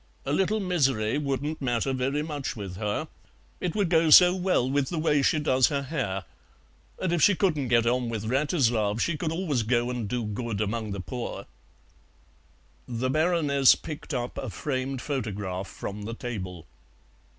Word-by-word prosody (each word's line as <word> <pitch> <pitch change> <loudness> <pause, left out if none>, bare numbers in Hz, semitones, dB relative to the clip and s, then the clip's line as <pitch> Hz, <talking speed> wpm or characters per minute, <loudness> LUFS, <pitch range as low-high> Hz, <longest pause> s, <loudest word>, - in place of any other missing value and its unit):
"A 140 - -1
little 195 +6 +1
misery 135 - +1
wouldn't 145 +2 -2
matter 125 +1 0
very 135 +3 -1
much 150 -3 -4
with 100 -4 -6
her; 105 0 -2 0.5
it 175 -3 -2
would 205 -3 +2
go 165 -1 +4
so 180 +3 +9
well 180 -9 +1
with 135 0 0
the 175 - -3
way 150 -2 +2
she 155 - +3
does 130 -4 +3
her 140 -2 -1
hair, 125 - -3 0.8
and 185 -2 0
if 170 - +1
she 205 - +6
couldn't 155 -8 +1
get 115 -1 +3
on 120 0 +1
with 110 -3 -3
Wratislav 120 - +1
she 170 +6 +1
could 160 0 -2
always 165 -7 0
go 120 +2 +1
and 120 -5 -3
do 120 0 -2
good 105 0 -3
among 110 +1 -2
the 100 -1 -4
poor." 120 +5 -5 1.4
The 125 +2 -2
Baroness 155 -4 +4
picked 155 -1 -8
up 120 0 -3
a - - -4
framed 135 -2 -3
photograph 100 -8 -3
from 105 +1 -7
the 115 +3 -5
table. 95 -9 -6
130 Hz, 170 wpm, -27 LUFS, 115-155 Hz, 1.4 s, so